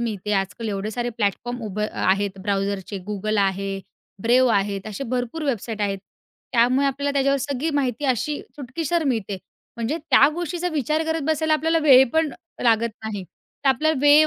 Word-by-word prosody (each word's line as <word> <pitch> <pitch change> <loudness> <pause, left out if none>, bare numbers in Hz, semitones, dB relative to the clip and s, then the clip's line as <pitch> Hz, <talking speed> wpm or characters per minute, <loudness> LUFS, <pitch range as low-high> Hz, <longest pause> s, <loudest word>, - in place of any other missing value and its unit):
मिळते. 210 -3 -2
आजकाल 200 +3 -1
एवढे 200 +1 -2
सारे 240 +1 -2
प्लॅटफॉर्म 235 +4 -1
उभे 210 +1 -2
आहेत. 195 +1 0
ब्राउझरचे 195 0 -2
Google 210 +1 -1
आहे. 195 0 -1 0.5
Brave 250 +1 +5
आहेत. 200 0 0
असे 215 +6 -5
भरपूर 250 +6 -2
वेबसाईट 225 -5 -2
आहेत. 195 -1 0 0.5
त्यामुळे 250 +4 +4
आपल्याला 280 +1 -1
त्याच्यावर 275 0 +2
सगळी 280 +3 -2
माहिती 265 -1 0
अशी 275 +3 0 0.2
चुटकीसर 310 +5 -2
मिळते. 220 -7 -1 0.4
म्हणजे 235 +7 -1
त्या 285 -2 +5
गोष्टीचा 350 +1 -2
विचार 305 +2 0
करत 320 -1 -1
बसायला 315 0 +2
आपल्याला 325 +1 +2
वेळ 265 -3 +8
पण 320 -3 +2 0.3
लागत 230 -1 +3
नाही. 205 -3 -4
तर 230 - -6
आपल्याला 305 +3 +2
वेळ 290 +2 +7
245 Hz, 160 wpm, -23 LUFS, 205-290 Hz, 0.5 s, वेळ